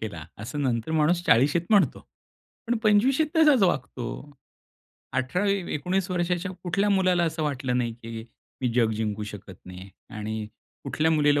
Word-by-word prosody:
केला 85 Hz, -8 st, -6 dB, 0.2 s
असं 145 Hz, +6 st, -4 dB
नंतर 120 Hz, +1 st, -1 dB
माणूस 160 Hz, +3 st, +2 dB
40 135 Hz, +2 st, +5 dB
शीत 170 Hz, -, +1 dB
म्हणतो, 205 Hz, -3 st, +3 dB, 0.7 s
पण 240 Hz, +1 st, +1 dB
25 215 Hz, +5 st, +4 dB
शीत 315 Hz, -, +2 dB
तसाच 300 Hz, -8 st, +5 dB
वागतो. 130 Hz, -8 st, 0 dB, 1.1 s
18-19 180 Hz, +4 st, -1 dB
वर्षाच्या 180 Hz, +1 st, -1 dB
कुठल्या 195 Hz, +4 st, +1 dB
मुलाला 185 Hz, -3 st, +3 dB
असं 160 Hz, -1 st, -2 dB
वाटलं 135 Hz, -4 st, -1 dB
नाही, 120 Hz, -2 st, -1 dB
की 115 Hz, -1 st, -8 dB, 0.4 s
मी 130 Hz, -, +1 dB
जग 115 Hz, -3 st, +3 dB
जिंकू 105 Hz, -1 st, -2 dB
शकत 100 Hz, -2 st, -10 dB
नाही 90 Hz, +1 st, -10 dB, 0.3 s
आणि 110 Hz, 0 st, -4 dB, 0.4 s
कुठल्या 160 Hz, +1 st, +1 dB
मुलीला 150 Hz, -2 st, +3 dB
150 Hz, 145 wpm, -26 LUFS, 115-185 Hz, 1.1 s, 40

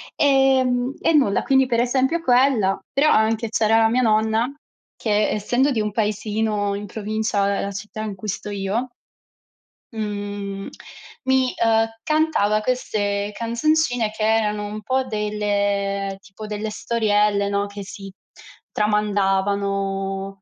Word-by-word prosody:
Ehm, 265 Hz, -2 st, +3 dB
e 330 Hz, -, +2 dB
nulla, 270 Hz, -10 st, +3 dB
quindi, 265 Hz, -1 st, +3 dB
per 235 Hz, -2 st, +1 dB
esempio, 265 Hz, +7 st, +1 dB
quella, 245 Hz, -7 st, +3 dB
però 295 Hz, +3 st, +3 dB
anche 220 Hz, +1 st, +2 dB
c'era 225 Hz, 0 st, +3 dB
la 225 Hz, 0 st, +5 dB
mia 250 Hz, +3 st, +2 dB
nonna 220 Hz, +2 st, +2 dB, 0.4 s
che 210 Hz, -1 st, +1 dB
essendo 245 Hz, +6 st, +1 dB
di 230 Hz, -, 0 dB
un 210 Hz, 0 st, -1 dB
paesino 210 Hz, -1 st, -1 dB
in 205 Hz, +1 st, -5 dB
provincia 215 Hz, -1 st, -1 dB
della 200 Hz, 0 st, -1 dB
città 210 Hz, +3 st, -7 dB
in 210 Hz, -2 st, -4 dB
cui 210 Hz, +3 st, -8 dB
sto 205 Hz, +1 st, -4 dB
io 205 Hz, +5 st, -2 dB, 1.0 s
mhmm, 205 Hz, -2 st, -4 dB, 0.6 s
mi, 260 Hz, -1 st, +2 dB
ehm, 225 Hz, 0 st, +3 dB, 0.2 s
cantava 305 Hz, -10 st, +2 dB
queste 205 Hz, -4 st, -1 dB
canzoncine 245 Hz, 0 st, +1 dB
che 215 Hz, 0 st, -4 dB
erano 215 Hz, -1 st, +1 dB
un 210 Hz, +1 st, -6 dB
po' 260 Hz, +3 st, 0 dB
delle 205 Hz, -2 st, -1 dB
tipo 200 Hz, +2 st, -11 dB
delle 210 Hz, +1 st, -4 dB
storielle, 210 Hz, -2 st, +1 dB
no, 200 Hz, 0 st, 0 dB
che 200 Hz, 0 st, -8 dB
si 195 Hz, 0 st, -9 dB, 0.6 s
tramandavano. 195 Hz, -1 st, 0 dB
215 Hz, 130 wpm, -22 LUFS, 200-235 Hz, 1.0 s, la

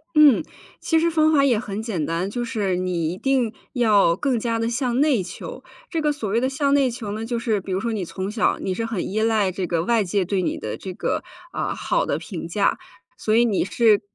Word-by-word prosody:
嗯， 300 Hz, -5 st, +7 dB, 0.4 s
其 325 Hz, -1 st, +2 dB
实 335 Hz, -, +2 dB
方 315 Hz, -1 st, +3 dB
法 280 Hz, -3 st, +4 dB
也 245 Hz, -6 st, +3 dB
很 210 Hz, -2 st, -4 dB
简 200 Hz, -9 st, -2 dB
单， 170 Hz, +5 st, -1 dB
就 240 Hz, +3 st, -3 dB
是 205 Hz, -5 st, -1 dB
你 180 Hz, -3 st, -1 dB
一 -, -, -8 dB
定 255 Hz, -2 st, +1 dB, 0.2 s
要， 210 Hz, -8 st, +4 dB
更 250 Hz, +4 st, 0 dB
加 230 Hz, 0 st, -1 dB
地 230 Hz, 0 st, 0 dB
向 245 Hz, +1 st, 0 dB
内 285 Hz, -8 st, +3 dB
求。 180 Hz, 0 st, -8 dB, 0.3 s
这 330 Hz, -, -1 dB
个 300 Hz, -1 st, +2 dB
所 285 Hz, -7 st, -4 dB
谓 225 Hz, +4 st, +1 dB
的 260 Hz, -, +1 dB
向 280 Hz, 0 st, +1 dB
内 275 Hz, -2 st, +4 dB
求 230 Hz, -4 st, -5 dB
呢， 215 Hz, +2 st, -4 dB
就 235 Hz, 0 st, -2 dB
是 220 Hz, -4 st, 0 dB
比 190 Hz, -, -7 dB
如 185 Hz, -, 0 dB
说 230 Hz, +3 st, -2 dB
你 205 Hz, -4 st, -2 dB
从 190 Hz, +3 st, -4 dB
小 220 Hz, 0 st, +1 dB
你 190 Hz, -, -2 dB
是 225 Hz, +4 st, -2 dB
很 230 Hz, -6 st, -3 dB
依 215 Hz, +3 st, -1 dB
赖 220 Hz, -4 st, +2 dB
这 185 Hz, 0 st, -3 dB
个 170 Hz, -1 st, 0 dB
外 230 Hz, +2 st, +2 dB
界 190 Hz, 0 st, 0 dB
对 190 Hz, +1 st, 0 dB
你 -, -, -1 dB
的 -, -, -5 dB
这 190 Hz, -, -7 dB
个， -, -, -2 dB, 0.3 s
呃， -, -, -2 dB
好 -, -, 0 dB
的 -, -, 0 dB
评 170 Hz, -5 st, -6 dB
价， 200 Hz, +4 st, +1 dB, 0.4 s
所 215 Hz, 0 st, +1 dB
以 240 Hz, -, +5 dB
你 210 Hz, -5 st, +1 dB
是， 215 Hz, +1 st, +3 dB
220 Hz, 260 characters per minute, -23 LUFS, 190-250 Hz, 0.4 s, 嗯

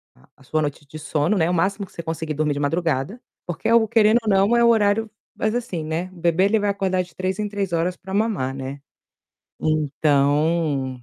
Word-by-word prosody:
a 65 Hz, -, -25 dB
a 135 Hz, -, -20 dB
sua 155 Hz, +4 st, -1 dB
noite 145 Hz, 0 st, -4 dB
de 155 Hz, -, -9 dB
sono, 155 Hz, +6 st, 0 dB
né, 165 Hz, 0 st, +2 dB
o -, -, 0 dB
máximo 195 Hz, +3 st, 0 dB
que -, -, -22 dB
você 170 Hz, -, -7 dB
conseguir 160 Hz, -1 st, -3 dB
dormir 150 Hz, 0 st, 0 dB
de 140 Hz, -, -4 dB
madrugada, 165 Hz, -, -1 dB, 0.2 s
porque 175 Hz, +3 st, -4 dB
é -, -, +2 dB
algo 230 Hz, -1 st, +5 dB
querendo 225 Hz, 0 st, +4 dB
ou 215 Hz, -, -1 dB
não, 200 Hz, +4 st, +4 dB
é 235 Hz, -, +4 dB
o 235 Hz, -, +6 dB
horário 220 Hz, 0 st, +2 dB, 0.3 s
mas, 220 Hz, +2 st, -1 dB
assim, 210 Hz, -10 st, -3 dB
né 165 Hz, +4 st, -3 dB
o 175 Hz, -, -14 dB
bebê 170 Hz, +2 st, +2 dB
ele 215 Hz, +2 st, +2 dB
vai 205 Hz, 0 st, 0 dB
acordar 190 Hz, -2 st, 0 dB
de 175 Hz, -2 st, -18 dB
3 185 Hz, +2 st, -2 dB
em 210 Hz, -, -1 dB
3 200 Hz, -4 st, -3 dB
horas 175 Hz, +2 st, 0 dB
para 190 Hz, +1 st, -9 dB
mamar, 200 Hz, -, 0 dB
né. 135 Hz, +1 st, -6 dB, 0.8 s
Então 145 Hz, -2 st, +1 dB
175 Hz, 225 wpm, -22 LUFS, 150-205 Hz, 0.8 s, o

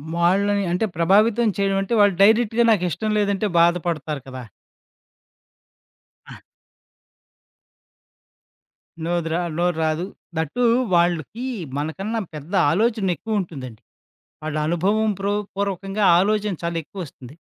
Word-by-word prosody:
వాళ్ళని 200 Hz, +4 st, +2 dB
అంటే 180 Hz, +5 st, +1 dB
ప్రభావితం 210 Hz, +7 st, +3 dB
చేయడంంటే, 195 Hz, +2 st, 0 dB
వాళ్ళు 205 Hz, -2 st, +4 dB
డైరెక్ట్‌గా 225 Hz, +2 st, +4 dB
నాకు 205 Hz, -5 st, +2 dB
ఇష్టం 215 Hz, +6 st, -2 dB
లేదంటే 200 Hz, 0 st, 0 dB
బాధపడతారు 170 Hz, -3 st, +1 dB
కదా! 130 Hz, -1 st, -8 dB, 1.8 s
ఆ! -, -, -10 dB, 2.7 s
నోదిరా 170 Hz, 0 st, -1 dB, 0.2 s
నోరు 175 Hz, 0 st, +1 dB
రాదు. 160 Hz, +2 st, 0 dB, 0.3 s
థట్ 160 Hz, -2 st, -1 dB
టూ 245 Hz, -, +2 dB, 0.3 s
వాళ్ళకి 175 Hz, -, 0 dB, 0.3 s
మనకన్నా 195 Hz, +10 st, -3 dB, 0.2 s
పెద్ద 150 Hz, +5 st, -9 dB, 0.2 s
ఆలోచనెక్కువ 215 Hz, +1 st, 0 dB
ఉంటుందండి. 130 Hz, -, -7 dB, 0.6 s
వాళ్ళ 155 Hz, -1 st, -3 dB
అనుభవం 200 Hz, +7 st, +1 dB
ప్రో 200 Hz, +1 st, -1 dB, 0.2 s
పూర్వకంగా 195 Hz, +1 st, -2 dB, 0.2 s
ఆలోచన 210 Hz, +1 st, +1 dB
చాలా 170 Hz, 0 st, -2 dB
ఎక్కువ 195 Hz, +6 st, -11 dB
వస్తుంది. 130 Hz, 0 st, -13 dB
190 Hz, 105 wpm, -22 LUFS, 165-205 Hz, 2.7 s, వాళ్ళు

